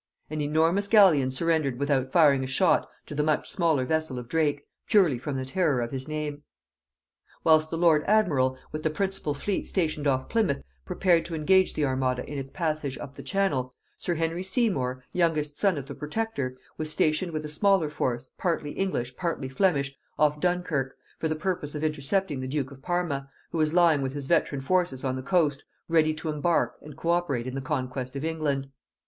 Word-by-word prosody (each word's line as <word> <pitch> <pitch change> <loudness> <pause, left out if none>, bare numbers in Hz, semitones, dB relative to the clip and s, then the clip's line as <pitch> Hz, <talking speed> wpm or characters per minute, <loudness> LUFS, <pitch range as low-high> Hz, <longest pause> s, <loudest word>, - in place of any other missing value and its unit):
An 155 -1 -2
enormous 165 +7 +2
galleon 185 - +6
surrendered 150 -1 +1
without 135 -2 0
firing 145 -6 +5
a - - -3
shot 165 +7 +2 0.2
to - - -8
the 150 - 0
much 150 0 0
smaller 160 -8 +1
vessel 160 -2 -1
of 125 -1 -6
Drake, 145 -1 0 0.2
purely 180 - +4
from 145 +2 -4
the 130 - -3
terror 150 -1 +1
of 120 -1 -2
his 130 0 -5
name. 150 -1 -4 1.0
Whilst 155 -1 +5
the 165 - -3
lord 165 -3 +4
admiral, 145 -12 +3
with 155 - -4
the 155 - +1
principal 190 -3 -1
fleet 195 +7 -2
stationed 155 -5 -1
off 130 -1 +1
Plymouth, 215 -11 0 0.2
prepared 175 -3 +2
to 170 - -5
engage 185 +4 +3
the 150 - +1
armada 130 -2 -1
in 145 -1 -4
its 135 0 -6
passage 155 -4 -2
up 135 - -8
the - - -8
Channel, 140 -11 -1 0.2
sir 175 - -1
Henry 165 +2 -1
Seymour, 185 - 0
youngest 155 -4 0
son 195 -5 +3
of 140 - -5
the - - -7
protector, 150 -6 -3 0.2
was 155 0 -2
stationed 155 +4 +1
with 155 -1 -3
a - - -3
smaller 190 +2 +2
force, 130 -4 -3
partly 165 -5 -1
English 130 -11 -2
partly 165 -6 -3
Flemish, 140 -3 +1 0.2
off 150 0 +2
Dunkirk, 175 -6 -1 0.2
for 160 - 0
the 155 - -1
purpose 155 -3 -3
of 150 - -3
intercepting 155 +1 0
the 130 - -4
duke 135 0 -2
of 135 -1 -13
Parma, 165 -5 -2 0.2
who 165 - -2
was 155 -1 +2
lying 170 -5 +5
with 135 0 -2
his 145 -1 -4
veteran 145 -2 +1
forces 175 -3 0
on 130 -1 -1
the 130 - -4
coast, 145 -2 +1 0.2
ready 155 -2 +3
to 160 +1 -5
embark 155 +3 0
and 150 -1 -11
co 165 +1 0
operate 155 -9 0
in 130 - -5
the 135 - -3
conquest 130 -2 -3
of 140 +3 -3
England. 150 -4 -1
150 Hz, 195 wpm, -27 LUFS, 135-170 Hz, 1.0 s, galleon